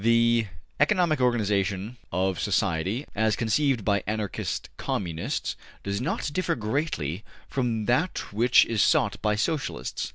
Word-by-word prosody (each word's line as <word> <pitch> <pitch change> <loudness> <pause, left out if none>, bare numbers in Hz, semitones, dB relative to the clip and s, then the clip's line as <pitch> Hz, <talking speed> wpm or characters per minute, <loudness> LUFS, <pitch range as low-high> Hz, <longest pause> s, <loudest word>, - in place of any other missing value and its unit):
The 115 -1 +4 0.3
ECONOMIC 165 -2 +3
organization 105 -2 0
of 95 0 0
society, 95 - 0
as 110 0 +2
conceived 120 0 +1
by 100 -2 +2
Anarchist 105 -3 -3
Communists, 85 -4 -2 0.3
does 100 +2 -2
not 145 +1 -2
differ 185 +2 0
greatly 110 - -2 0.2
from 120 -5 -1
that 145 - 0
which 120 +4 +5
is 110 -3 0
sought 100 - +2
by 105 -1 +2
Socialists. 145 +7 -2
110 Hz, 125 wpm, -26 LUFS, 100-130 Hz, 0.3 s, which